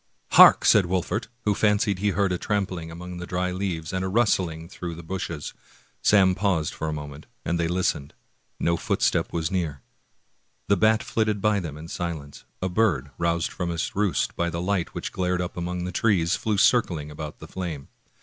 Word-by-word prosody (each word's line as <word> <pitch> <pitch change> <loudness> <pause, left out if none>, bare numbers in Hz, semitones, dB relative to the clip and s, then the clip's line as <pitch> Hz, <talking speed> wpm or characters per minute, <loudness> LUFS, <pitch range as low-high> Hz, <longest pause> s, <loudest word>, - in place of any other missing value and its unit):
"Hark!" - - +8
said 100 -5 +6
Wolfert, 95 +5 -1 0.2
who 105 - +3
fancied 105 -2 +2
he 105 +1 +1
heard 100 -1 +1
a 90 - -1
tram 100 -1 0
pling 85 -4 -7
among 90 +2 -8
the 90 0 -6
dry 90 0 -1
leaves 90 -4 -3
and 95 0 -1
a - - -1
rustling 95 -6 +1
through 85 -2 -6
the 85 - -9
bushes. 85 -3 -5 0.5
Sam 95 -3 +5
paused 90 -5 0
for 80 - -4
a - - -1
moment, 75 0 -7 0.2
and 85 - 0
they 85 - +1
listened. 85 -5 -1 0.4
No 85 0 +1
footstep - - 0
was 80 +1 -2
near. 80 -8 -2 0.8
The 100 - +4
bat 110 +3 +3
flitted 110 -2 0
by 105 0 +2
them 80 -5 -6
in 80 +2 -9
silence; 80 -5 -5 0.2
a - - +1
bird, 90 - +1
roused 85 0 0
from 90 -2 -3
its 85 -1 -3
roost 100 -2 0
by 85 0 0
the 85 0 -4
light 90 -1 -1
which - - -4
glared 90 -1 -1
up 90 0 -3
among 90 0 -3
the 90 - -3
trees, 95 -3 +2
flew 110 -2 -1
circling 85 -10 +2
about 75 0 -7
the - - -11
flame. 85 -7 -5
90 Hz, 195 wpm, -25 LUFS, 80-100 Hz, 0.8 s, Hark